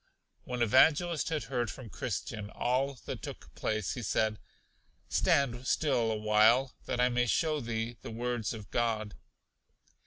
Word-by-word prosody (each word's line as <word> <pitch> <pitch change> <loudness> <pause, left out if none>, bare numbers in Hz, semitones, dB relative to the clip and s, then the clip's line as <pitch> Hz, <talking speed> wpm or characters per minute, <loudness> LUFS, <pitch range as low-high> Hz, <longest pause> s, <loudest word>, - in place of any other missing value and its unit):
When 125 -1 -1
Evangelist 155 +8 +4
had 155 -4 -1
heard 120 -1 -2
from 115 -3 -9
Christian 105 +3 -4
all 130 +5 0
that - - -5
took - - -9
place, 110 -4 -2
he 125 - -5
said: 110 0 0 0.7
Stand 130 -2 +2
still 120 -7 +2
a 110 - -1
while, 110 +5 +4
that 120 - -2
I 125 - +5
may 125 0 +1
show 155 +4 +1
thee 115 -1 -3
the - - -7
words 120 -1 -2
of 110 -3 -8
God. 110 -3 0
120 Hz, 150 wpm, -31 LUFS, 110-130 Hz, 0.7 s, I